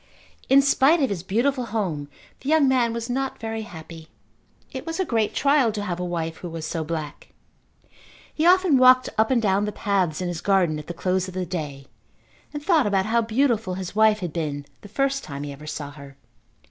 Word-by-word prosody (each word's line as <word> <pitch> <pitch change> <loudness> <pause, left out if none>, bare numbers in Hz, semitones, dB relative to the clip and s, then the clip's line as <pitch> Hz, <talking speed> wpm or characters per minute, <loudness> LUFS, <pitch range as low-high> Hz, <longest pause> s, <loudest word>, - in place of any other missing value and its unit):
In 275 +1 +6
spite 280 +4 +4
of 265 - +1
his 185 -4 -3
beautiful 245 +8 0
home 175 -11 -3 0.3
the 275 - -5
young 310 -3 +4
man 250 -3 +2
was 230 0 -4
not 265 +2 -2
very 225 0 -4
happy. 165 -5 -10 0.6
It 260 - -6
was 330 +3 -5
a 375 - +1
great 225 -7 0
trial 275 -4 +3
to 205 -1 -3
have 180 -3 -3
a - - -2
wife 165 -2 -3
who 175 - -7
was 165 -1 -6
so 165 0 -3
black. 155 -2 -5 1.1
He 310 - -2
often 360 -5 +5
walked 255 0 +6
up 220 0 +2
and 260 -2 +3
down 205 -2 +1
the 210 - -2
paths 195 -7 0
in 180 - -2
his 175 -2 -4
garden 180 -6 +2
at 150 - -10
the 175 - -6
close 185 +1 0
of 185 - -9
the 185 -1 -2
day 150 -6 -5 0.7
and 295 -1 -6
thought 325 - +3
about 195 -2 +1
how 230 +2 +2
beautiful 225 -4 0
his 185 +1 -6
wife 215 -1 +4
had 175 -4 -4
been 145 -4 -3 0.2
the - - -11
first 275 +5 0
time 140 -1 -6
he 145 - -5
ever 150 +2 -12
saw 145 -2 -5
her. 140 -1 -13
205 Hz, 210 wpm, -24 LUFS, 165-255 Hz, 1.1 s, In